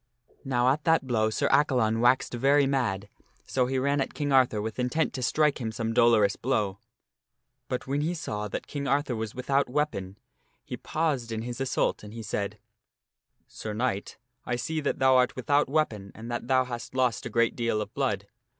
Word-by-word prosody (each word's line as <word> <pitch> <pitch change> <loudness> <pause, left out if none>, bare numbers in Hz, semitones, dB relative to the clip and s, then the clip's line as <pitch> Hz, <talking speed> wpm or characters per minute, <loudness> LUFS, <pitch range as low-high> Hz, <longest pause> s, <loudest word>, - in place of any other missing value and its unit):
Now 125 -1 +2
at 145 +3 +1
that 160 -4 +3
blow 110 -4 +1
Sir 110 - 0
Accalon 125 -6 +3
waxed 125 +2 +3
very 140 +4 +4
mad, 120 -8 0 0.4
so 125 -2 0
he 130 +1 -1
ran 140 +2 +1
at - - -4
King 145 -2 -1
Arthur 130 -5 +4
with 110 +3 -4
intent 125 +6 0
to 130 - -4
strike 150 +3 +2
him 110 -2 -2
some 115 0 -3
dolorous 115 -4 +4
blow. 105 -6 -1 0.9
But 125 - -3
when 140 +2 -1
he 165 +4 -1
saw 105 -10 -4
that - - -5
King 140 -1 -4
Arthur 140 -1 +1
was 110 -1 -4
without 135 +2 +1
weapon, 115 -9 -2 0.5
he - - -5
paused 145 -8 -2
in 110 0 -3
his 120 +1 -5
assault 135 - 0
and 105 +1 -10
he 115 - -6
said, 100 -1 -3 0.5
" - - -56
Sir 105 -1 -6
Knight, 110 -4 -2 0.3
I 125 - -2
see 155 +6 -2
that 140 - -1
thou 130 -1 +5
art 125 0 +2
without 145 +2 +1
weapon 110 -10 -1
and 115 +2 -8
that 120 - -4
thou 130 0 +4
hast 120 0 -7
lost 125 -3 +1
a - - -6
great 115 +1 +2
deal 115 -2 0
of 105 +2 -5
blood. 125 -8 -1
125 Hz, 195 wpm, -27 LUFS, 110-135 Hz, 0.9 s, thou